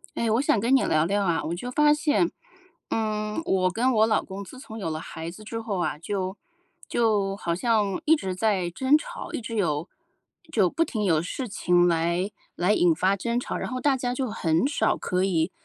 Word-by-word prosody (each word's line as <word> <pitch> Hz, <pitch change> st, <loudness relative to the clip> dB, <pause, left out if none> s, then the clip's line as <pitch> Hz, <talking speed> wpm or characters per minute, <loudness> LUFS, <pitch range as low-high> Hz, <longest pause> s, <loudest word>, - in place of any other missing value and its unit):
哎， 230 Hz, -1 st, 0 dB
我 230 Hz, +4 st, +3 dB
想 280 Hz, -, +2 dB
跟 240 Hz, +5 st, +2 dB
你 270 Hz, -, +5 dB
聊 155 Hz, 0 st, +3 dB
聊 200 Hz, +4 st, +1 dB
啊， 170 Hz, -4 st, +1 dB
我 160 Hz, +2 st, -3 dB
就 245 Hz, +8 st, -5 dB
发 295 Hz, +3 st, +4 dB
现， 310 Hz, +2 st, +1 dB, 0.6 s
嗯， 215 Hz, +1 st, -1 dB
我 185 Hz, -, +2 dB
跟 235 Hz, +8 st, +1 dB
我 220 Hz, -2 st, +4 dB
老 215 Hz, -, +2 dB
公 195 Hz, +1 st, -7 dB
自 260 Hz, -, -12 dB
从 225 Hz, -4 st, -9 dB
有 190 Hz, -, -3 dB
了 155 Hz, -, -3 dB
孩 160 Hz, +1 st, -6 dB
子 185 Hz, +5 st, -11 dB
之 225 Hz, +2 st, -5 dB
后 220 Hz, -4 st, -3 dB
啊， 160 Hz, -, -1 dB
就 190 Hz, +3 st, -3 dB, 0.5 s
就 210 Hz, -4 st, +1 dB
好 170 Hz, -4 st, -2 dB
像 205 Hz, 0 st, +1 dB
一 320 Hz, -, +6 dB
直 190 Hz, -12 st, -3 dB
在 185 Hz, -2 st, 0 dB
争 265 Hz, -, +3 dB
吵， 310 Hz, -, -8 dB
一 -, -, -3 dB
直 230 Hz, 0 st, -6 dB
有 160 Hz, -4 st, 0 dB, 0.6 s
就 195 Hz, -6 st, +4 dB
不 330 Hz, -, +1 dB
停 215 Hz, -4 st, -3 dB
有 165 Hz, -5 st, +3 dB
事 240 Hz, +8 st, -5 dB
情 175 Hz, -3 st, +3 dB
来 170 Hz, +4 st, 0 dB, 0.2 s
来 180 Hz, +4 st, +2 dB
引 175 Hz, -5 st, +4 dB
发 190 Hz, +4 st, +2 dB
争 235 Hz, +4 st, -1 dB
吵， 245 Hz, -, -2 dB
然 -, -, -4 dB
后 255 Hz, 0 st, -4 dB
大 280 Hz, -2 st, +3 dB
家 245 Hz, -1 st, -2 dB
就 255 Hz, -1 st, -2 dB
很 165 Hz, -1 st, +1 dB
少 275 Hz, -6 st, +1 dB
可 185 Hz, 0 st, -1 dB
以， 175 Hz, -2 st, +1 dB
205 Hz, 230 characters per minute, -26 LUFS, 180-235 Hz, 0.6 s, 一